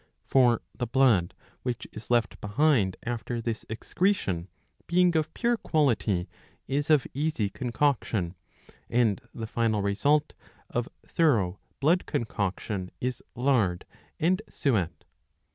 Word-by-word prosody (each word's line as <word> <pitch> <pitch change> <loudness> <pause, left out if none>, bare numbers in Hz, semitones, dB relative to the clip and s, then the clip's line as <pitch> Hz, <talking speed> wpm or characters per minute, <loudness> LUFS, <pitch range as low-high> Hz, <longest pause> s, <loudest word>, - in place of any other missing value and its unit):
For 120 -3 +4
the 120 - -2
blood 115 -9 +3 0.3
which 125 -2 -3
is 110 - -10
left 120 -3 +1
behind 105 -3 +2
after 120 0 -3
this 115 -1 -4
excretion, 110 - 0 0.4
being 175 0 +4
of 155 0 +1
pure 240 -1 +2
quality, 115 - +1 0.4
is 145 +3 -1
of 150 -4 +5
easy 140 -8 0
concoction, 120 -8 0 0.6
and 115 -5 +2
the 115 - -5
final 110 -2 0
result 145 +10 +2 0.4
of - - -1 0.2
thorough 105 - +2 0.2
blood 165 +6 +3
concoction 100 -3 -2
is 125 0 -2
lard 115 -9 +1 0.3
and 185 +5 +2
suet. 105 - 0
120 Hz, 115 wpm, -28 LUFS, 105-145 Hz, 0.6 s, of